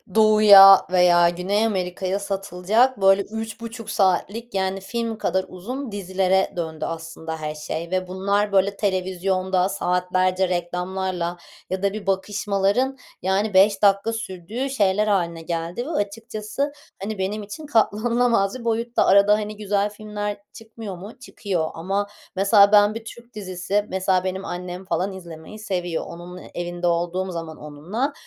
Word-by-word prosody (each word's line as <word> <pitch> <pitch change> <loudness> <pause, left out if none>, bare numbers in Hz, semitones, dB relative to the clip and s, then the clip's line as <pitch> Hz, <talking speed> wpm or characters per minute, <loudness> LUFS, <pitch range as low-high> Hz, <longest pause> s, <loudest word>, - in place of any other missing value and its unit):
Doğu'ya 210 -3 +9
veya 175 -1 +5
Güney 190 +5 0
Amerika'ya 190 -1 -2
satılacak 200 +4 0
böyle, 195 +1 +5
3,5 225 +1 -7
saatlik, 205 +4 0
yani, 190 0 -1
film 230 +2 -3
kadar 190 -2 0
uzun 245 +8 -6
dizilere 190 -1 0
döndü 160 -3 -4
aslında 165 0 -6
her 155 0 -5
şey 160 +2 -5
ve 185 -1 -1
bunlar, 200 +3 0
böyle, 200 +1 +2
televizyonda 185 -1 0
saatlerce 185 0 0
reklamlarla 180 0 -2 0.3
ya 190 +1 -3
da 200 - +1
bir 205 -2 -7
bakışmaların, 200 +6 0 0.2
yani, 195 +3 0
5 195 +1 +5
dakika 200 +2 +3
sürdüğü 225 +4 -4
şeyler 210 -4 +1
hâline 170 -5 0
geldi 170 +7 -4
ve - - -6
açıkçası, 220 +2 -3 0.3
hani, 210 +2 -4
benim 200 +3 -2
için 205 +10 -8
katlanılamaz 230 -2 +1
bir 235 - -10
boyutta. 230 +1 +1
Arada, 200 +1 +6
hani, 210 0 -2
güzel 205 -1 0
filmler 210 0 -5 0.2
çıkmıyor 220 -4 -9
mu? 205 +7 -11
Çıkıyor. 185 -10 -3
Ama, 195 +5 -2 0.3
mesela, 200 +1 +5
ben 205 0 +6
bir 225 - -7
Türk 235 +1 -12
dizisi, 195 0 -2
mesela, 185 -1 +1
benim 190 +1 -3
annem 180 +1 -6
falan 190 +2 -1
izlemeyi 175 +2 -10
seviyor. 180 -5 -3
Onun 175 +2 -9
evinde 175 0 -3
olduğum 175 +2 -1
zaman 165 -2 -6
onunla. 175 - -4
195 Hz, 140 wpm, -23 LUFS, 180-215 Hz, 0.3 s, Doğu'ya